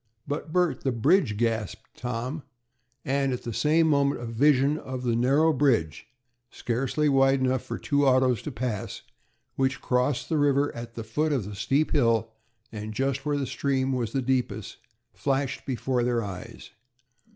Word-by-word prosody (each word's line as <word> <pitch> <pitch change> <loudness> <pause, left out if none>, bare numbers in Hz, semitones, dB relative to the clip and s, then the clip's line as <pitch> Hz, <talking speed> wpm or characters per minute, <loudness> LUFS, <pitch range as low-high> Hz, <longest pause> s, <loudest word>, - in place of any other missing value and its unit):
"But, 150 +2 -4
Bert, 175 -6 +1
the 135 - 0
bridge!" 125 - +2
gasped 115 -3 -2
Tom, 125 +5 -4 0.6
and 135 0 +1
at 125 - -4
the 120 - -4
same 155 +7 +3
moment 140 -2 +2
a 120 - -6
vision 140 +5 +3
of 130 -1 -6
the 120 -2 +1
narrow 140 +7 +3
bridge, 120 - +1 0.4
scarcely 130 +6 -1
wide 135 -1 +4
enough 130 -1 +1
for - - -6
two 140 -1 +1
autos 130 -3 +3
to 150 - -5
pass, 120 -5 -4 0.5
which 130 -1 +1
crossed 125 +2 0
the 160 -3 0
river 145 0 +2
at 120 0 -8
the 115 - -5
foot 150 +8 -1
of 130 -9 0
the 105 - -7
steep 135 +9 0
hill, 115 -5 +2 0.4
and 105 -1 -6
just 135 +2 -1
where 145 -1 +1
the 140 - -1
stream 135 -1 -1
was 120 -4 -2
deepest, 125 -4 -1 0.4
flashed 135 -1 -2
before 125 0 -1
their 120 -1 0
eyes. 95 -3 -8
130 Hz, 165 wpm, -26 LUFS, 115-140 Hz, 0.6 s, wide